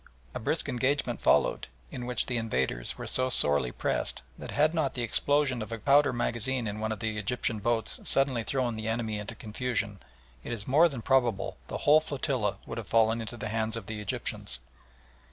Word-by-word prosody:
A -, -, -4 dB
brisk -, -, 0 dB
engagement 130 Hz, -1 st, 0 dB
followed, -, -, +3 dB, 0.2 s
in 125 Hz, -1 st, -5 dB
which 125 Hz, -, 0 dB
the 125 Hz, -, -1 dB
invaders 65 Hz, -, -1 dB
were -, -, -6 dB
so 130 Hz, 0 st, +2 dB
sorely 75 Hz, -, +4 dB
pressed -, -, -2 dB
that -, -, -9 dB
had 155 Hz, +2 st, +2 dB
not 155 Hz, -5 st, 0 dB
the 125 Hz, -, -2 dB
explosion 140 Hz, +1 st, +1 dB
of 110 Hz, -, -6 dB
a 115 Hz, -, -3 dB
powder 140 Hz, +5 st, +4 dB
magazine 120 Hz, 0 st, -1 dB
on 105 Hz, +1 st, -4 dB
one 110 Hz, 0 st, -2 dB
of 110 Hz, -, -4 dB
the 110 Hz, -1 st, -2 dB
Egyptian 110 Hz, +1 st, -1 dB
boats 115 Hz, +1 st, 0 dB
suddenly 135 Hz, -4 st, +3 dB
thrown 125 Hz, -2 st, -1 dB
the 110 Hz, 0 st, -5 dB
enemy 110 Hz, -2 st, -1 dB
into 105 Hz, +3 st, -6 dB
confusion, 105 Hz, -3 st, -2 dB, 0.4 s
it -, -, -6 dB
is 110 Hz, -3 st, -5 dB
more 155 Hz, +6 st, +5 dB
than 125 Hz, -7 st, -7 dB
probable 120 Hz, -7 st, +1 dB
the -, -, -4 dB
whole 150 Hz, +1 st, +7 dB
flotilla 130 Hz, -, -2 dB
would -, -, -5 dB
have 110 Hz, -, -8 dB
fallen 115 Hz, 0 st, +3 dB
into 115 Hz, +2 st, -7 dB
the 110 Hz, -, -4 dB
hands 110 Hz, 0 st, 0 dB
of 115 Hz, -, -6 dB
the 110 Hz, -1 st, -5 dB
Egyptians. 65 Hz, -10 st, -3 dB
115 Hz, 195 wpm, -29 LUFS, 110-130 Hz, 0.4 s, whole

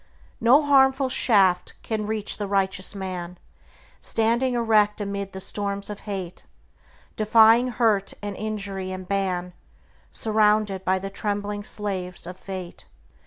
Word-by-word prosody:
No 255 Hz, +6 st, +5 dB
harmful 270 Hz, -1 st, +4 dB
shaft 195 Hz, -8 st, +2 dB
can 215 Hz, -2 st, -3 dB
reach 215 Hz, -1 st, -2 dB
the 205 Hz, -, -2 dB
righteous 195 Hz, 0 st, -1 dB
man, 180 Hz, -2 st, -5 dB, 0.6 s
Standing 235 Hz, +3 st, +1 dB
erect 215 Hz, -3 st, +3 dB
amid 200 Hz, -1 st, -4 dB
the 190 Hz, -, -7 dB
storms 200 Hz, +1 st, -3 dB
of 205 Hz, -, -7 dB
hate, 185 Hz, -3 st, -6 dB, 0.7 s
Defying 225 Hz, +3 st, +5 dB
hurt 220 Hz, -5 st, +1 dB
and 205 Hz, -1 st, -5 dB
injury 200 Hz, -3 st, -4 dB
and 185 Hz, -1 st, -7 dB
ban, 185 Hz, -2 st, -1 dB, 0.6 s
Surrounded 210 Hz, -3 st, +1 dB
by 190 Hz, 0 st, +2 dB
the 195 Hz, +1 st, -6 dB
trembling 205 Hz, 0 st, -3 dB
slaves 190 Hz, -5 st, -4 dB
of 180 Hz, +1 st, -7 dB
Fate. 185 Hz, -2 st, -8 dB
205 Hz, 125 wpm, -24 LUFS, 190-220 Hz, 0.7 s, No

